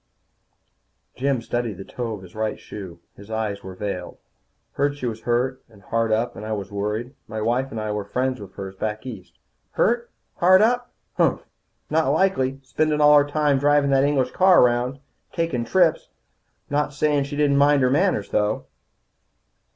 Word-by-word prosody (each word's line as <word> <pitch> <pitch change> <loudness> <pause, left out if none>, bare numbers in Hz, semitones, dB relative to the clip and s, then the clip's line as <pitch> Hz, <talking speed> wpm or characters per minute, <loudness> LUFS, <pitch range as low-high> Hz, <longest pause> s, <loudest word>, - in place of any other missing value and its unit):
Jim 135 -2 0
studied 120 -4 -2
the 95 - -7
toe 120 -3 -4
of 95 - -12
his 90 - -14
right 110 0 -2
shoe. 95 -5 -9 0.2
His 100 +1 -14
eyes 110 -2 -2
were 95 0 -8
veiled. 95 -2 -5 0.6
"I - - -32
heard 145 +1 +1
she 130 - -5
was 115 -2 -3
hurt, 125 +2 -1
and 105 -3 -19
hard 115 +2 0
up, 115 +3 0
and - - -8
I 110 0 -3
was 100 -2 -5
worried. 105 +5 -3
My 110 - -5
wife 120 +5 0
and 115 - -5
I 110 0 -3
were 105 -1 -2
friends 125 +4 -2
of 100 -2 -10
hers 95 -1 -7
back 110 +3 -4
east." 110 -8 -9 0.4
"Hurt, 235 +1 +1 0.3
hard 185 +3 +6
up? 245 +2 +1 0.3
Humph! - - +2 0.5
Not 160 -2 +2
likely, 140 -5 +1
spendin' 150 +3 0
all 150 0 +7
her 145 0 +4
time 145 -2 +2
drivin' 145 0 +3
that 135 0 +4
English 135 -3 +1
car 185 -1 +6
around. 125 +2 +1 0.4
Takin' 165 -9 -1
trips. 170 +5 +2 0.6
I'm 145 - +1
not 150 0 0
sayin' 150 -1 +2
she 140 +1 -6
didn't 145 -1 +2
mind 145 -1 +4
her 125 - +3
manners, 150 - +1
though." 105 +1 0
125 Hz, 180 wpm, -23 LUFS, 110-145 Hz, 0.6 s, all